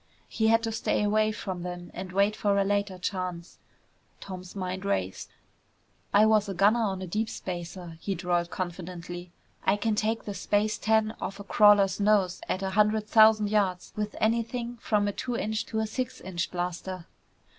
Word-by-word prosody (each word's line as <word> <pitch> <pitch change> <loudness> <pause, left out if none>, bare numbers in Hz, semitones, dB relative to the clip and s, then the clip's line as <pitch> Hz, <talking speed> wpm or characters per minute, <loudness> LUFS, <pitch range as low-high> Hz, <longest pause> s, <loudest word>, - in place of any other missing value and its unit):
He 220 - 0
had 225 +1 +4
to 225 - -1
stay 220 -1 0
away 215 +1 +2
from 190 -4 -5
them 175 0 -6
and 185 +1 -6
wait 200 +3 +2
for 200 -2 +1
a 200 - +4
later 200 -1 0
chance. 180 -2 -4 0.6
Tom's 185 -1 -9
mind 185 0 -4
raced. 95 - -2 0.8
"I 205 +2 +6
was 215 -2 +3
a 195 - -3
gunner 205 +6 +4
on 190 -3 -1
a - - -3
deep 215 +5 -2
spacer," 175 -2 -6
he 195 - -2
drawled 175 -1 0
confidently. 175 -1 -6 0.3
"I 195 - +3
can 220 +1 0
take 220 +2 -1
the 205 - -4
space 210 +2 0
tan 220 0 +2
off 195 +2 -4
a - - -6
crawler's 205 -2 +5
nose 200 -3 +2
at 185 - -1
a 190 - -1
hundred 210 +1 +2
thousand 215 -1 +5
yards 195 -4 0
with 210 0 -3
anything 235 +2 -1
from 210 -3 +1
a - - +1
two 240 +4 -3
inch 220 0 -2
to 220 - -4
a - - 0
six 255 +3 -4
inch 180 -2 -3
blaster." 180 0 -4
200 Hz, 180 wpm, -28 LUFS, 180-215 Hz, 0.8 s, I